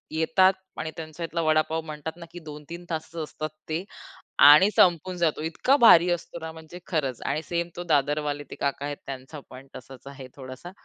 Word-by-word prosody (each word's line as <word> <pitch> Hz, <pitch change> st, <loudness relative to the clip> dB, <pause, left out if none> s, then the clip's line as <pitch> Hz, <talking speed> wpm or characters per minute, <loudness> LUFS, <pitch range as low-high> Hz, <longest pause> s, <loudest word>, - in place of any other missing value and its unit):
येतात 185 Hz, +4 st, +4 dB, 0.3 s
आणि 160 Hz, -, -4 dB
त्यांच्यातला 165 Hz, +1 st, -5 dB
वडापाव 155 Hz, +1 st, +1 dB
म्हणतात 155 Hz, +2 st, -7 dB
ना 170 Hz, -, -10 dB
की 175 Hz, -, -9 dB
2-3 155 Hz, +3 st, -10 dB
तासच 160 Hz, 0 st, -5 dB
असतात 155 Hz, +1 st, -6 dB, 0.2 s
ते. 160 Hz, +4 st, -2 dB, 0.6 s
आणि 150 Hz, +8 st, +9 dB
संपून 180 Hz, +1 st, +3 dB
जातो 160 Hz, -3 st, 0 dB
इतका 165 Hz, -, +2 dB
भारी 180 Hz, -9 st, +7 dB
असतो 175 Hz, 0 st, -4 dB
ना 160 Hz, 0 st, -6 dB
म्हणजे 160 Hz, +2 st, -11 dB
खरंच. 140 Hz, -8 st, -2 dB
आणि 145 Hz, +3 st, -1 dB
सेम 170 Hz, 0 st, -2 dB
तो 175 Hz, -, -5 dB
दादरवाले 145 Hz, 0 st, 0 dB
ते -, -, -6 dB
काका 140 Hz, 0 st, -2 dB
आहेत 145 Hz, 0 st, -4 dB
त्यांचा 135 Hz, +2 st, -8 dB
पण 130 Hz, +1 st, -12 dB
तसाच 130 Hz, 0 st, -12 dB
आहे 135 Hz, -2 st, -9 dB
थोडासा, 130 Hz, +5 st, -10 dB
155 Hz, 175 wpm, -26 LUFS, 145-170 Hz, 0.6 s, आणि